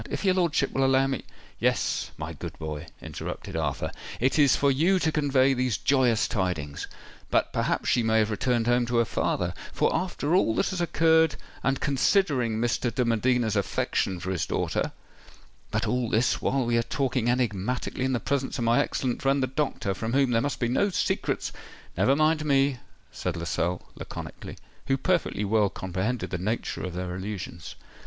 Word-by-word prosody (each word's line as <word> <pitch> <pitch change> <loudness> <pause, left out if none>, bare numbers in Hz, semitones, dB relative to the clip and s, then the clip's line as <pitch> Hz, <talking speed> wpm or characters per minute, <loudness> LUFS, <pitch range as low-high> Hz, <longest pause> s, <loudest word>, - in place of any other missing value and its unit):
"If - - -3
your 190 - +5
lordship 170 -7 +1
will 135 - +2
allow 135 0 +4
me——" 135 -2 -3 0.3
"Yes, - - 0
my - - -5
good - - -8
boy," 80 0 -5 0.2
interrupted - - -6
Arthur. 80 -4 -1 0.3
"It 130 +5 +2
is 140 -4 +6
for 140 -1 +3
you 165 +8 +3
to 160 -3 +1
convey 135 -3 +3
these 125 -5 0
joyous 125 -4 +2
tidings. 85 -8 -2 0.4
But - - +1
perhaps - - 0
she 120 - +3
may 110 -1 +2
have 110 0 +2
returned 120 +2 +1
home 120 0 +2
to 120 0 0
her 115 - +4
father—for, - - -1
after 175 -4 -1
all 115 -12 +3
that - - +1
has 185 -2 -2
occurred, 160 -1 +3 0.3
and 135 0 0
considering 135 - +2
Mr. 120 +1 0
de 125 +2 0
Medina's 115 -1 +1
affection 95 -2 0
for 95 +2 -3
his 90 - -1
daughter——But - - -4
all 125 -2 0
this 115 +3 +2
while 135 -1 +1
we 115 0 +2
are - - +3
talking 125 0 -1
enigmatically 125 +1 -1
in 130 0 +1
the 120 - +1
presence 140 +2 -1
of 120 - -2
my 115 +1 +3
excellent 125 -2 -2
friend 135 0 +2
the - - +4
doctor, 130 -7 -1
from 115 +4 -4
whom 135 -2 +3
there 115 -1 +3
must 145 +2 -2
be 120 - +1
no 130 - +2
secrets——" 185 - -1 0.4
"Never 105 +10 +3
mind 155 +1 +2
me," 140 -3 +2 0.3
said 90 -2 -3
Lascelles 85 +1 -1
laconically, - - -8 0.3
who 135 - +2
perfectly 170 - 0
well 105 0 +3
comprehended 95 +8 -3
the 90 - -2
nature 105 +6 -2
of 90 -1 -4
their 90 0 -3
allusions. 95 -3 -6
125 Hz, 175 wpm, -27 LUFS, 105-140 Hz, 0.4 s, is